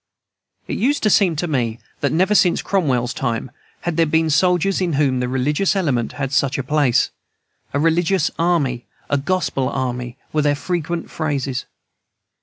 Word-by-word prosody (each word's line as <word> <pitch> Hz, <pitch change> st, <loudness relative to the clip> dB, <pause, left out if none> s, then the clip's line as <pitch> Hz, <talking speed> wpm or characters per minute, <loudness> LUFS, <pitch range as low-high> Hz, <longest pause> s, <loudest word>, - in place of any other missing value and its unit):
It -, -, -3 dB
used 280 Hz, +6 st, +1 dB
to 215 Hz, -, +3 dB
seem 185 Hz, -5 st, +4 dB
to 175 Hz, +4 st, -2 dB
me 120 Hz, -7 st, -1 dB, 0.2 s
that 140 Hz, -, 0 dB
never, 185 Hz, +5 st, +2 dB
since 185 Hz, -4 st, +3 dB
Cromwell's 130 Hz, -11 st, 0 dB
time, 120 Hz, -1 st, -2 dB, 0.3 s
had 175 Hz, -2 st, -3 dB
there 165 Hz, -1 st, +4 dB
been 160 Hz, +1 st, +2 dB
soldiers 180 Hz, +4 st, +2 dB
in 175 Hz, -3 st, 0 dB
whom 135 Hz, -3 st, +2 dB
the 125 Hz, -, -1 dB
religious 145 Hz, +10 st, +1 dB
element 140 Hz, -12 st, 0 dB
held 135 Hz, -2 st, -3 dB
such 140 Hz, -2 st, +1 dB
a 135 Hz, -, -2 dB
place. 130 Hz, -3 st, +2 dB, 0.6 s
"A 145 Hz, -, -1 dB
religious 165 Hz, +2 st, +2 dB
army," 150 Hz, -8 st, +1 dB, 0.2 s
"a 145 Hz, -, +3 dB
gospel 145 Hz, -4 st, -1 dB
army," 125 Hz, -1 st, -3 dB, 0.2 s
were 155 Hz, -, +2 dB
their 145 Hz, 0 st, +2 dB
frequent 170 Hz, +2 st, -3 dB
phrases. 140 Hz, -5 st, -2 dB
150 Hz, 165 wpm, -20 LUFS, 130-175 Hz, 0.6 s, seem